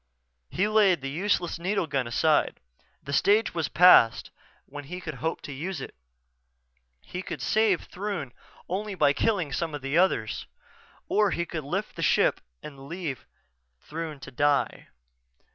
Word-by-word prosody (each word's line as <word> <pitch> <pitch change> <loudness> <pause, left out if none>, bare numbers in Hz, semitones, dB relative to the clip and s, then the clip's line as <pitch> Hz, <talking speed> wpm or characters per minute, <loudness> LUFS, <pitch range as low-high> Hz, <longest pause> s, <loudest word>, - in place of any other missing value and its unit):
He 195 +3 0
laid 205 -7 +4
the 135 0 -4
useless 175 +1 -1
needle 190 +1 0
gun 135 -5 -1
aside. 155 +6 +2 0.4
The 140 - -6
stage 205 +9 +3
was 165 -4 -1
past 150 -9 +6 0.3
when 145 0 -9
he 180 +5 -6
could 160 -3 -6
hope 160 +1 -2
to - - -8
use 165 +5 -4
it. - - -8 1.1
He 180 - -6
could - - -6
save 215 -5 +2
Throon 185 -9 -5 0.4
only 200 +3 -3
by 145 -5 +3
killing 175 -2 0
some 160 +1 -2
of 145 - -8
the 140 +5 +1
others 145 - 0 0.6
or 210 -1 +3
he 170 -1 -1
could 155 -2 -5
lift 185 +9 -4
ship - - +3 0.2
and 140 -2 -10
leave 165 -6 -5 0.5
Throon 155 - -6
to 135 - -9
die. 145 +2 0
165 Hz, 150 wpm, -27 LUFS, 140-190 Hz, 1.1 s, past